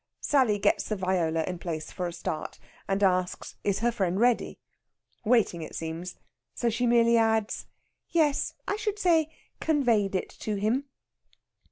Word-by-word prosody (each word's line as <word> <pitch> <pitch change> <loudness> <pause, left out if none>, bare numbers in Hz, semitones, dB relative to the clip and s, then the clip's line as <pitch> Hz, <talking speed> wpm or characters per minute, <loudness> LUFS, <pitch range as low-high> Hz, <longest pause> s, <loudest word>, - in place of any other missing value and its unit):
'" - - -58
Sally 255 -8 +4
gets 200 - +1
the 215 - 0
viola 175 -4 0
in 180 +1 -4
place 160 -3 -5
for 180 - -3
a - - -4
start, 170 -2 -5 0.3
and 195 +1 0
asks 185 -1 +1
is 200 +1 0
her 240 +1 +3
friend 190 -4 0
ready? 240 0 +2 0.7
Waiting, 220 -7 +2
it 155 - -7
seems; 165 +2 -5 0.4
so 235 -1 0
she 245 +2 0
merely 235 0 +5
adds, 220 -1 +1 0.4
"Yes, 305 -4 +1
I 410 - 0
should 425 -1 -2
say 330 -6 +3 0.3
conveyed 235 -11 +2
it 185 - -2
to 215 - -2
him." 220 +7 0
215 Hz, 160 wpm, -28 LUFS, 180-245 Hz, 0.7 s, merely